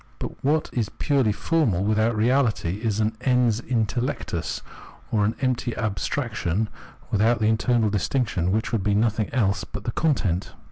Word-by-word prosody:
But - - -7
what 155 +3 +1
is 115 -5 -1
purely 135 -7 +1
formal 110 - +1
without 110 +2 +2
reahty 110 -6 +1
is 110 -2 -1
an 110 0 +1
ens 125 -3 +2
intellectus, 120 - -2 0.5
or 105 -1 +2
empty 125 -2 0
abstrac 110 +5 -2
tion 105 +2 -1 0.4
without 110 +3 +3
the 110 - 0
internal 110 0 +2
distinction 100 -3 0
which 110 +3 0
would 115 -4 0
be 100 0 +2
nothing 110 0 +1
else 100 -6 +1
but - - -7
the 120 - -2
content. 110 - 0
110 Hz, 150 wpm, -24 LUFS, 105-125 Hz, 0.5 s, without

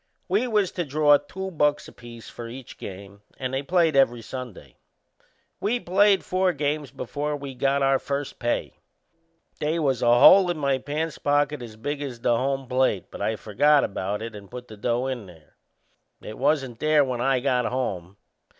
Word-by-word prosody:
We 205 +7 +1
was 210 -5 +1
to 175 - -2
draw 145 0 +4
two 190 +5 -7
bucks 150 -3 +1
apiece 115 -1 -12
for 120 - -8
each 125 +1 -10
game 100 +1 -9 0.2
and 130 -1 -4
they 135 - 0
played 165 0 +2
every 120 -4 +3
Sunday. 125 -5 -9 0.8
We 235 +4 0
played 195 0 +3
four 185 0 +1
games 145 -1 -2
before 145 +3 -4
we 140 -1 -7
got 135 +2 +1
our 135 0 +3
first 140 0 -4
pay. 120 0 -2 0.8
They 155 +3 0
was 135 -6 0
a 120 0 +5
hole 185 +7 +8
in 175 - -1
my 140 -3 0
pants 150 +4 -4
pocket 145 -1 +1
as 115 -3 -9
big 145 +6 -4
as 130 -5 -5
the 120 - +2
home 135 +2 -1
plate, 125 -6 0
but - - -9
I 110 +2 0
forgot 145 +8 +3
about 100 +2 -3
it 115 -1 -7
and 100 -2 -11
put 125 0 -9
the 110 - -9
dough 120 +4 -1
in 125 -6 -4
there. 80 -4 -18 0.6
It 110 - -9
wasn't 135 -4 0
there 155 -2 +3
when 125 -2 -3
I 135 0 +2
got 125 -2 +1
home. 100 -7 -3
135 Hz, 185 wpm, -25 LUFS, 120-150 Hz, 0.8 s, hole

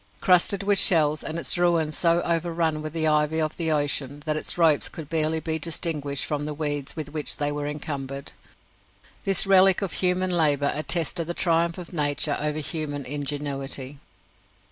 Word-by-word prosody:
Crusted 185 +2 +3
with 200 -1 +3
shells, 155 -3 +4
and 160 - -4
its 170 - +2
ruin 170 -3 +2
so 170 +2 +2
overrun 165 -2 -1
with 155 0 -5
the 160 0 -1
ivy 150 +1 +1
of 155 -1 -1
the 165 -2 -1
ocean 145 -1 -1
that 155 -1 -1
its 155 - 0
ropes 160 -4 +3
could 160 -3 -9
barely 160 0 0
be 160 0 -3
distinguished 155 -4 -2
from 145 -1 -3
the 150 0 -5
weeds 145 -2 -3
with 155 -3 -5
which 150 -2 -1
they 145 0 -1
were 145 0 -4
encumbered, 140 -2 -6 0.9
this 195 -2 +2
relic 195 0 +5
of 190 - -3
human 185 0 +1
labour 145 -4 +2
attested 165 +2 0
the 175 - -3
triumph 170 -1 +1
of 180 0 -9
nature 145 -2 +1
over 150 0 -2
human 150 -2 -3
ingenuity. 140 -1 -4
155 Hz, 170 wpm, -24 LUFS, 145-170 Hz, 0.9 s, relic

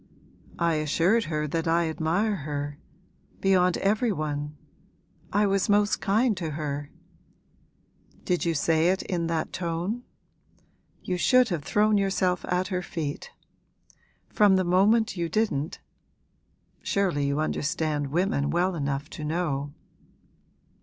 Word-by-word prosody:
'I 170 -1 +2
assured 170 +9 +2
her 150 -1 -2
that 165 +3 -2
I 165 0 +2
admire 175 +7 0
her 145 -1 -5 0.6
beyond 180 -2 +3
every 215 +4 +1
one. 150 -3 -3 0.7
I 205 +1 +3
was 195 0 +1
most 205 0 +3
kind 215 +3 +2
to 170 -3 -3
her.' 145 -1 -4 1.4
'Did 180 -1 0
you 170 -1 0
say 160 +2 +2
it 190 +1 0
in 170 -3 -2
that 165 -1 -2
tone? 175 +6 -2 1.0
You 180 - -2
should 255 +6 +4
have 170 -5 -2
thrown 210 +5 +2
yourself 190 -2 0
at 180 +1 0
her 180 -2 -1
feet! 155 -5 -5 1.0
From 205 -2 +4
the 190 - +2
moment 200 +5 +3
you 170 -1 -1
didn't 180 -8 -1 1.0
surely 175 -8 0
you 140 +1 0
understand 155 -1 -1
women 150 -1 0
well 180 +2 +1
enough 140 -2 -2
to 155 - -7
know.' 150 -3 -2
170 Hz, 125 wpm, -26 LUFS, 150-195 Hz, 1.4 s, should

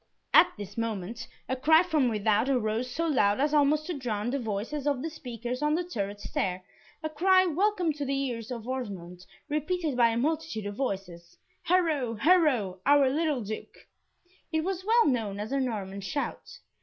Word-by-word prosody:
At - - +7
this 205 +1 -7
moment 225 0 -4 0.2
a 260 - -1
cry 315 +6 +5
from 310 -8 +2
without 215 +2 +1
arose, 240 -1 0
so 330 +7 -2
loud 210 -10 +2
as 295 +2 +1
almost 300 +1 +3
to 355 - -3
drown 240 -5 -2
the 280 - -1
voices 235 +6 -3
of 280 -2 0
the 325 - -3
speakers 245 -3 -5
on 300 +1 +2
the 355 - 0
turret 205 - -4
stair, 185 -2 -2 0.4
a 315 - -1
cry 370 +5 +4
welcome 360 -1 +1
to 290 0 -5
the 275 0 -1
ears 245 -4 -3
of 235 -2 -6
Osmond, 190 -9 -6 0.2
repeated 305 0 -1
by 235 -1 +5
a 225 - -1
multitude 305 -5 -1
of 205 - -4
voices, 190 -8 -5 0.2
"Haro! 315 -9 +1
Haro! 255 - +3
our 280 0 +5
little 300 -3 0
Duke!" 215 +1 -7 0.7
It 315 -1 0
was 375 0 -3
well 460 +3 +4
known 220 -7 0
as 210 +3 -5
a 275 - +1
Norman 200 -6 -3
shout. 240 +9 -4
260 Hz, 180 wpm, -28 LUFS, 215-310 Hz, 0.7 s, At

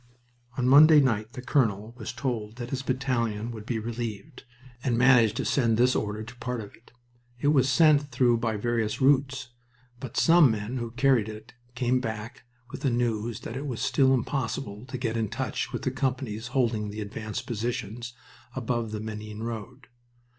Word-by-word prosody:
On 125 - +1
Monday 150 +3 +8
night 115 -4 +1
the 125 - -7
colonel 115 -5 +1
was 115 -2 -6
told 120 -4 -3
that 120 0 -7
his 135 -1 -2
battalion 120 -4 -1
would 110 -1 -9
be 120 - -1
relieved, 115 -1 -6 0.4
and 120 -3 +1
managed 120 -4 +5
to - - -1
send 115 -5 +2
this 125 +2 +4
order 105 +1 -2
to 115 +2 -10
a - - -24
part 125 0 -3
of 105 -2 -8
it. 115 - -23 0.5
It 145 - +2
was 135 -3 +3
sent 145 +1 +4
through 120 -3 +3
by 115 -2 -1
various 115 -1 -1
routes, 135 -1 +2 0.5
but 130 -3 -7
some 165 -4 +6
men 110 +3 -3
who 120 -1 -3
carried 125 -2 +2
it 110 +1 -10 0.2
came 125 +1 +1
back 110 -2 -6 0.3
with - - -7
the 135 - +2
news 120 -2 -1
that 115 - -7
it 140 +3 -4
was 120 -5 -4
still 130 -1 +3
impossible 120 -3 -3
to 130 - -5
get 115 -2 -2
into 110 0 -2
touch 130 -4 -2
with - - -4
the 130 - 0
companies 125 -4 -2
holding 120 -5 0
the 105 +1 -6
advanced 110 +1 -5
positions 120 +1 -4 0.4
above 120 -2 -2
the 105 0 -4
Menin 110 0 -6
road. 120 +3 -6
120 Hz, 185 wpm, -27 LUFS, 110-130 Hz, 0.5 s, Monday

